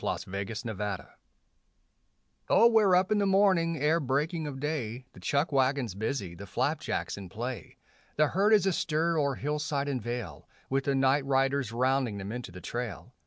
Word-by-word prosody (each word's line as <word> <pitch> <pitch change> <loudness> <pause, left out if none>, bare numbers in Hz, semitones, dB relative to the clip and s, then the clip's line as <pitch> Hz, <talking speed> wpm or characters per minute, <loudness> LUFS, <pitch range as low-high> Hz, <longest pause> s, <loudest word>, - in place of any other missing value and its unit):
THE - - -2
RAILROAD 105 +3 -5
CORRAL 105 -3 -3 1.4
Oh 230 - +7
we're 210 -5 +5
up 185 +3 +2
in 210 - +3
the 200 - +2
morning 190 -4 +3
ere 155 +4 +2
breaking 150 +4 -1
of 135 -2 -6
day, 130 -5 -3
The - - -13
chuck 140 - 0
wagon's 135 -5 +1
busy, 100 -2 -3
the 100 +4 -10
flapjacks - - -2
in 95 -3 -8
play; 120 +6 -6 0.4
The 155 -1 +4
herd 200 +4 +3
is 205 -3 +5
astir 165 -2 +1
o'er 140 -2 +1
hillside 150 -1 -2
and 135 -3 -2
vale, 120 +2 -6 0.2
With 135 0 +1
the 140 - +1
night 135 +1 +3
riders 135 -2 +1
rounding 130 -2 +1
them 100 +1 -5
into 120 -4 -6
the 90 +1 -10
trail. 120 0 -5
135 Hz, 170 wpm, -29 LUFS, 115-155 Hz, 1.4 s, Oh